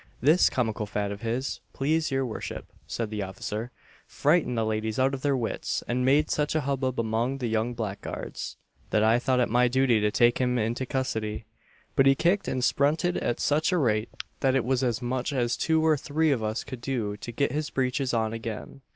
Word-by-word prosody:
"This 155 +8 +5
comical 110 -4 -1
fad 100 0 -2
of 100 0 -7
his, 120 +4 -2
please 155 +3 +1
your 135 -1 0
worship," 115 - -5 0.2
said 115 -2 -3
the 105 -1 -2
officer, 105 +4 -4 0.4
"frightened 145 -5 +2
the 115 - +2
ladies 110 0 -1
out 135 +1 +2
of 135 - -4
their 140 -1 +1
wits, 115 -3 -2
and 125 +1 0
made 145 +4 +3
such 150 +1 0
a 155 - +2
hubbub 130 -2 -1
among 115 +4 0
the 130 - -3
young 115 +1 0
blackguards, 105 -4 -5 0.3
that 105 - +2
I 115 +2 +4
thought 125 0 +1
it 125 - +3
my 125 +2 +3
duty 125 -3 +3
to 105 - +3
take 120 +3 +3
him 125 -1 +1
into 120 +3 -1
custody; 110 -5 -2 0.5
but 135 - +5
he 135 - +6
kicked 180 +7 +1
and 130 -1 -1
sprunted 155 +7 +2
at 120 - -1
such 155 +4 +2
a 180 - +2
rate, 110 -7 +1 0.3
that 135 -1 +2
it 130 - +1
was 130 0 +1
as 125 0 0
much 125 +3 -1
as 125 -3 0
two 160 -1 +1
or 155 -1 +4
three 155 +3 +1
of 130 -5 +1
us 110 +2 -2
could 130 -2 -8
do 115 -6 -2
to 120 - -7
get 140 +2 0
his 150 +2 -2
breeches 130 0 0
on 110 -2 0
again." 115 +4 -6
125 Hz, 210 wpm, -27 LUFS, 110-135 Hz, 0.5 s, he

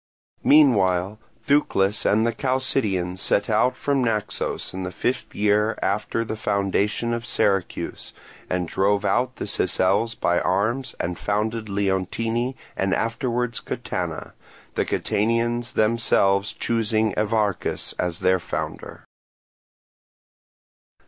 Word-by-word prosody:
Meanwhile 105 -9 +4 0.3
Thucles 105 -8 +2
and 110 +2 +3
the 115 - +1
Chalcidians 110 -9 0
set 100 - +1
out 110 +4 +2
from 140 -2 0
Naxos 105 -4 -2
in 95 - -4
the 90 0 -4
fifth 120 +8 -2
year 105 +1 +2
after 105 +3 -1
the 110 - -4
foundation 105 +2 0
of 115 0 -3
Syracuse, 95 -5 -1 0.4
and 90 -1 -1
drove 100 +3 +1
out 125 +4 +1
the - - -5
Sicels 105 +5 +1
by 85 -5 +2
arms 110 +8 0
and 85 +1 -3
founded 110 +1 -1
Leontini 100 +6 -1 0.2
and 95 0 +1
afterwards 120 0 -1
Catana; - - -4 0.4
the - - 0
Catanians 115 +2 0
themselves 105 -2 +2
choosing 110 -2 0
Evarchus 105 -2 0
as 90 -1 -2
their 95 0 +3
founder. 85 - -6
105 Hz, 110 wpm, -23 LUFS, 95-115 Hz, 0.4 s, Meanwhile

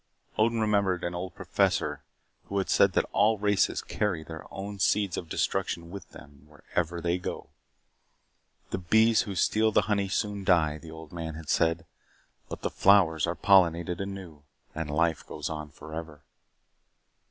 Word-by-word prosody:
Odin 115 +1 +2
remembered 100 -5 +1
an 85 - -2
old 90 +1 -5
professor 90 -6 0 0.4
who 100 - -4
had 95 - 0
said 100 -2 +4
that - - +2
all 110 +2 +3
races 105 -1 +1
carry 95 -7 -2
their 80 -1 -10
own 100 +1 -6
seeds 100 -1 +2
of 85 - -6
destruction 85 +1 -2
with 100 -2 -9
them 70 0 -15
wherever 85 +3 -3
they 85 +2 0
go. 90 - -6 1.2
The - - -2
bees 110 +5 +4
who 100 - -4
steal 110 +5 +2
the - - +4
honey 100 -2 0
soon 105 0 -2
die, 80 -5 +3
the 80 - -12
old 80 -1 -10
man 80 -2 -5
had 80 -1 -9
said, 85 0 +2 0.6
but - - -7
the - - -1
flowers 85 -6 +4
are 85 - -1
pollinated 85 0 +3
anew 95 -6 -7 0.3
and 80 -1 -4
life 80 +1 +1
goes - - -5
on 75 -1 -5
forever. 80 -1 -9
90 Hz, 160 wpm, -28 LUFS, 80-100 Hz, 1.2 s, said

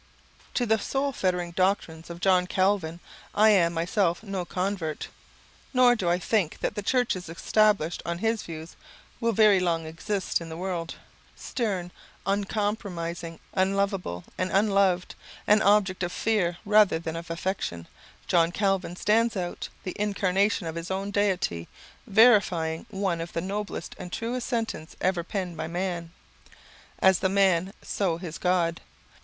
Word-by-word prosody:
To 245 - +2
the 220 -1 +2
soul 275 +5 -1
fettering 180 -7 -1
doctrines 170 -3 0
of 170 0 -7
John 185 -2 +3
Calvin 185 -3 +1 0.4
I 215 +1 +6
am 175 -5 +4
myself 175 +2 +1
no 195 -4 -3
convert; 180 -4 -3 0.7
nor 250 -1 +6
do 190 -7 -1
I 175 - +3
think 185 -2 0
that - - -1
the 210 - -3
churches 205 -6 0
established 200 -1 +2
on 170 0 -3
his 225 +3 0
views 160 0 -8 0.4
will 230 -1 +1
very 215 -2 +5
long 170 -3 0
exist 175 +4 -2
in 165 - -7
the 160 - -6
world. 175 -2 -3 0.4
Stern, 190 -7 -3 0.3
uncompromising, 195 -5 -2
unloveable 195 - 0 0.2
and 185 - 0
unloved, 195 -3 +2 0.3
an 210 +1 +5
object 200 -3 +3
of 175 -1 -1
fear 185 -6 0
rather 210 -4 +5
than 160 0 -5
of 170 +1 -6
affection, 165 - -3 0.4
John 170 -1 +3
Calvin 195 -2 0
stands 225 +3 +2
out 175 -1 -4
the 185 - -5
incarnation 200 -1 +1
of 160 - -3
his 170 +1 -6
own 195 +1 -2
Deity; 190 - 0 0.4
verifying 195 -7 +4
one 190 -4 -1
of 170 - -6
the - - -1
noblest 205 +3 -4
and 180 -1 -7
truest 240 +4 -3
sentences 225 -9 -3
ever 185 -2 +1
penned 180 -1 -4
by 160 0 -3
man: 175 -1 -3 0.9
"As 190 -2 +4
the 190 - +1
man, 190 -2 +3
so 180 -5 -1
his 170 -3 -7
God. 175 -2 +1
185 Hz, 150 wpm, -27 LUFS, 170-205 Hz, 0.9 s, I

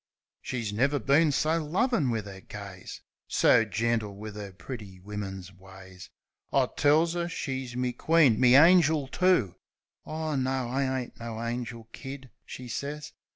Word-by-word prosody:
She's 115 -5 -4
never 140 +7 +2
been 145 +5 +3
so 160 +3 +1
lovin' 175 - +1
wiv 110 -3 -2
'er 95 -1 -10
gaze; 100 -3 -9 0.2
So 115 - +4
gentle 110 -1 -1
wiv 105 +1 -8
'er 100 -2 -7
pretty 100 -2 -9
wimmin's 95 -1 -7
ways. 95 0 -13 0.4
I - - +2
tells 160 +4 +3
'er 170 0 -2
she's 130 -6 -4
me 125 0 -1
queen, 145 -4 +4
me 125 0 +6
angel, 160 -2 +6
too. 175 - +2 0.5
"Ah, 155 -1 -3
no, 130 -1 -1
I 130 0 0
ain't 120 - -11
no 115 -1 -6
angel. 115 -1 -5
Kid," 135 -1 -9 0.2
she 125 - -8
says. 140 +5 -5
125 Hz, 150 wpm, -28 LUFS, 105-145 Hz, 0.5 s, me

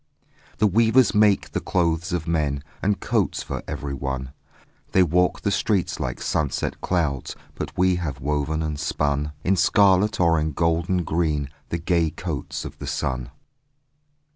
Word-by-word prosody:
The 105 - +3
weavers 115 +4 +4
make 105 -1 +3
the - - -1
clothes 85 0 0
of 85 -2 -2
men 75 -4 0 0.2
And 100 0 +1
coats - - 0
for - - -4
everyone; 70 -3 -4 0.6
They 95 - +6
walk 90 +2 +2
the 100 - 0
streets 100 -2 0
like - - -3
sunset 75 -3 -1
clouds; 80 -7 -1 0.2
But - - -6
we 90 0 +3
have 75 -7 -4
woven 75 +3 -1
and 75 -2 -3
spun 75 0 -1
In 95 - +3
scarlet 100 +3 +4
or 85 -2 +4
in 75 0 -1
golden 85 +3 +1
green 75 -4 -1 0.2
The 85 - -1
gay 85 -1 +1
coats - - -5
of - - -9
the - - -6
sun. 65 -2 -2
80 Hz, 150 wpm, -24 LUFS, 75-90 Hz, 0.6 s, They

